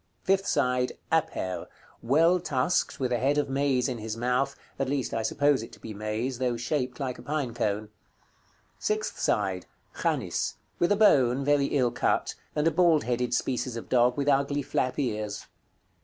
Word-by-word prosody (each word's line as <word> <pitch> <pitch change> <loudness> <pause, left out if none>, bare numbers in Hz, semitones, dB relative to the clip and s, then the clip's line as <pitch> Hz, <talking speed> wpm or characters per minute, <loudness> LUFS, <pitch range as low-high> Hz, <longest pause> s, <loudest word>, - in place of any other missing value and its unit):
Fifth 195 +1 +2
side. 125 0 +1 0.2
"APER." 155 - -1 0.3
Well 165 +9 +4
tusked, 145 0 0
with 130 -2 -1
a 120 - +1
head 140 +4 +2
of 145 - +1
maize 135 -2 +1
in 125 -3 -3
his 110 +1 -5
mouth; 125 +3 0 0.2
at 135 -1 0
least 140 -2 -1
I 115 - 0
suppose 145 +4 +2
it 115 - -9
to 110 - -13
be 110 - -7
maize, 110 +5 -3
though 125 -2 0
shaped 125 0 -2
like 130 -3 -3
a - - -8
pine 145 -5 -2
cone. 105 -2 -1 0.9
Sixth 215 0 -2
side. 95 -3 0 0.3
"CHANIS." - - -1 0.2
With 175 - +2
a - - +5
bone, 135 - +4
very 145 -1 +3
ill 125 -4 +1
cut; - - 0 0.2
and 150 0 +1
a 165 - +4
bald 165 -2 +4
headed 125 0 0
species 125 -1 -1
of 115 - -8
dog, 125 +1 +3
with 140 0 -1
ugly 140 0 +2
flap 130 0 -1
ears. 105 -6 -2
130 Hz, 175 wpm, -27 LUFS, 120-145 Hz, 0.9 s, a